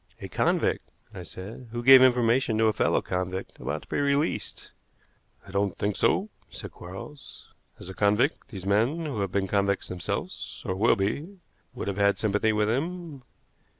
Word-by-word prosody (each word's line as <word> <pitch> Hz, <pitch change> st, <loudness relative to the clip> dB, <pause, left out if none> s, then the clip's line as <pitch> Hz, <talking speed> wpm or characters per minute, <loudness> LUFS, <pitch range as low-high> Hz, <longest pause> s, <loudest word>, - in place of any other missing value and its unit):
"A -, -, -6 dB
convict," -, -, 0 dB, 0.2 s
I -, -, -7 dB
said, 105 Hz, +7 st, -9 dB
"who 120 Hz, 0 st, -4 dB
gave 130 Hz, +1 st, +9 dB
information 120 Hz, -2 st, +3 dB
to 110 Hz, -, +3 dB
a 110 Hz, -, +3 dB
fellow -, -, +1 dB
convict 95 Hz, +1 st, -4 dB
about 70 Hz, +5 st, -4 dB
to -, -, -19 dB
be -, -, -2 dB
released." 140 Hz, +2 st, -1 dB, 0.7 s
"I 100 Hz, -, -12 dB
don't 100 Hz, -2 st, 0 dB
think 100 Hz, -1 st, -1 dB
so," 205 Hz, +3 st, +1 dB, 0.2 s
said -, -, -9 dB
Quarles. 95 Hz, +11 st, -11 dB, 0.3 s
"As -, -, -10 dB
a 95 Hz, -, -7 dB
convict, 105 Hz, -, +1 dB
these 95 Hz, -6 st, -9 dB
men, 115 Hz, +12 st, +1 dB
who 135 Hz, -8 st, -3 dB
have 100 Hz, -2 st, -1 dB
been 95 Hz, +1 st, 0 dB
convicts 100 Hz, 0 st, 0 dB
themselves, 90 Hz, -1 st, -5 dB
or 95 Hz, -, -1 dB
will 110 Hz, +5 st, +4 dB
be, 145 Hz, -, -3 dB, 0.4 s
would -, -, -5 dB
have 100 Hz, -1 st, -2 dB
had 100 Hz, 0 st, +3 dB
sympathy 110 Hz, +1 st, +1 dB
with 105 Hz, -1 st, +1 dB
him. 160 Hz, +4 st, -3 dB
105 Hz, 175 wpm, -27 LUFS, 95-130 Hz, 0.7 s, gave